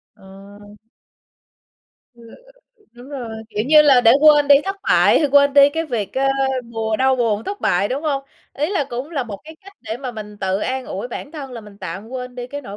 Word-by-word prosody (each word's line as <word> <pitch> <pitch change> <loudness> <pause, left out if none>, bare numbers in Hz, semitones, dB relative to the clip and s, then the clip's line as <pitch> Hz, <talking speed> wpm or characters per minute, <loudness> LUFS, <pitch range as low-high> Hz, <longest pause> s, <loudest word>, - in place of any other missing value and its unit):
Ờ. 200 +2 -15 1.4
Ờ, 235 - -17 0.7
đúng 245 +2 -14
rồi, 265 -5 -6 0.2
kiểu 210 +1 -2
như 305 +1 +7
là, 275 -4 +5
để 230 -2 +5
quên 295 -1 +5
đi 285 - +9
thất 390 0 -3
bại, - - +4
hay 295 - +1
quên 280 0 +4
đi 280 0 +7
cái 325 +2 -3
việc, 225 -8 -3
ơ, 270 - +1 0.5
buồn 220 -1 -2
đau 265 0 +2
buồn 225 -3 -1
thất 405 +1 -6
bại, 190 +3 +1
đúng 270 +4 -3
hông? 285 -3 -1 0.3
Ý 300 +6 -2
là 370 -8 0
cũng 250 +6 -5
là 285 -5 -2
một 205 -4 -8
cái 315 +1 -12
cách 395 - -13
để 220 - -6
mà 255 -1 -6
mình 210 -2 -9
tự 190 0 -1
an 260 0 -3
ủi 200 +6 -5
bản 280 +4 -8
thân 280 -5 -8
là 235 - -7
mình 205 -1 -15
tạm 190 +3 -7
quên 250 0 -7
đi 245 -1 -6
cái 285 +3 -7
nỗi 205 -6 -9
250 Hz, 220 wpm, -19 LUFS, 210-285 Hz, 1.4 s, đi